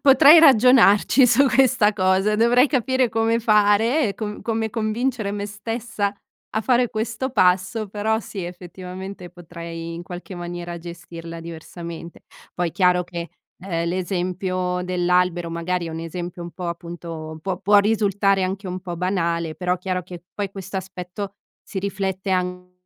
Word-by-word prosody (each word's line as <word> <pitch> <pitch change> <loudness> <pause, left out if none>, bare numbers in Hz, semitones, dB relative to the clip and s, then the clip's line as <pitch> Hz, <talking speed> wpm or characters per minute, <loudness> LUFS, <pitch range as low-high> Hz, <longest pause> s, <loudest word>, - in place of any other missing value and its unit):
potrei 285 +3 +8
ragionarci 250 -3 +6
su 275 +3 +5
questa 255 -6 +4
cosa, 190 +1 +2
dovrei 235 +4 +4
capire 260 -2 +1
come 225 +1 +1
fare, 220 +5 +3
e 200 - -4
com 210 -1 -5
come 225 -1 -2
convincere 225 -1 -1
me 205 0 -3
stessa 210 0 -3 0.4
a 220 - +1
fare 245 0 +3
questo 225 +4 -3
passo, 190 0 +2
però 215 +2 0
sì, 200 -3 -7
effettivamente 180 +1 -8
potrei, 170 -1 -8
in 170 - -6
qualche 180 +2 -8
maniera, 175 0 -6
gestirla 170 -1 -9
diversamente. 170 0 -9 0.3
Poi, 175 -1 -1
chiaro 180 0 +3
che, 170 -1 -6 0.3
ehm, 170 -3 -2
l'esempio 180 0 -2
dell'albero 180 -1 +1
magari 170 +1 -2
è - - -5
un 160 - -5
esempio 175 +1 -6
un 170 0 -7
po', 180 - -6
appunto, 170 -2 -7
può 185 -1 -2
può 205 +2 +4
risultare 200 -2 +3
anche 190 +2 -4
un 185 0 -4
po' 175 -2 -6
banale, 170 -3 -1
però 180 +1 -1
chiaro 180 0 -3
che 175 -1 -10
poi 200 -2 -3
questo 195 0 -5
aspetto 190 +1 -7 0.3
si 195 - -6
riflette 190 0 -3
anche 180 0 -2
185 Hz, 150 wpm, -22 LUFS, 175-215 Hz, 0.4 s, potrei